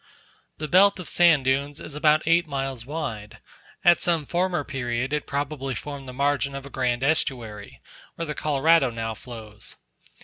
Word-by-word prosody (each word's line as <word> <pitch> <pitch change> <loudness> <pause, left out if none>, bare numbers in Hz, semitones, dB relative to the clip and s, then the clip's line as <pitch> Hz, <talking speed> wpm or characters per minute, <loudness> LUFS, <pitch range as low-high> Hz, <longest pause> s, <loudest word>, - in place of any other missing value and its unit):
The 155 - -4
belt 190 +3 +5
of 180 - -7
sand 165 -6 +4
dunes 140 +2 0
is 150 - -8
about 150 +1 +3
eight 165 +1 +3
miles 135 -4 -4
wide; 130 -9 -5 0.5
at 175 0 +6
some 165 -4 +1
former 175 -1 0
period, 130 -1 -3
it 150 - -2
probably 140 -2 -3
formed 140 -2 -7
the - - -6
margin 140 +1 0
of 140 0 -6
a 140 - -10
grand 125 -1 0
estuary, 120 -8 -1 0.3
where 165 - -3
the 150 - -3
Colorado 150 0 +3
now 115 -1 -4
flows. 110 -2 -9
140 Hz, 165 wpm, -25 LUFS, 125-155 Hz, 0.5 s, at